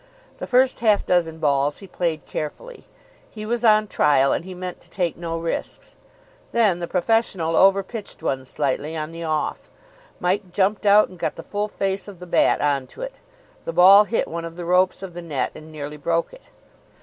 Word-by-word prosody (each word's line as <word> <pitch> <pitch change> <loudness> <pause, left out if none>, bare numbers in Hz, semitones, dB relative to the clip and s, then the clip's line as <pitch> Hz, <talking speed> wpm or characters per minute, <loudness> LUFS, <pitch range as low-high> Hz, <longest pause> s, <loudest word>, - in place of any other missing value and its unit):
The - - -5
first 255 +1 +3
half 215 -3 +3
dozen 165 -3 +1
balls 145 -1 +1
he 200 - -11
played 170 -4 -3
carefully. 480 - -6 0.4
He 215 -1 -8
was 235 +2 -2
on 215 -1 +5
trial, 145 -8 +3
and - - -2
he 185 0 -9
meant 180 0 -7
to - - -15
take 175 -4 -1
no 165 -1 -4
risks. 165 0 -5 0.6
Then 210 -7 +2
the 170 - -4
professional 180 -4 0
over 195 0 +5
pitched 210 -4 -9
one 135 -4 -1
slightly 145 +3 -2
on 155 +1 -4
the 165 0 -7
off. 155 -2 -2 0.5
Mike 185 +1 -1
jumped 200 +3 +1
out, 205 +1 +6
and 185 - -14
got - - -2
the - - -9
full 205 0 -2
face 195 -1 -3
of 200 -3 -10
the 180 - -10
bat 175 - +2
on 140 -3 0
to - - -13
it. - - -5 0.5
The 165 - -4
ball 195 +4 +8
hit 225 - -1
one 170 0 -5
of 165 0 -7
the 175 0 -6
ropes 185 +2 +2
of 185 -2 -7
the 175 - -7
net, 145 -7 -2
and 155 +1 -12
nearly 150 -1 -7
broke 165 +3 -1
it. - - -16
180 Hz, 200 wpm, -22 LUFS, 160-205 Hz, 0.6 s, ball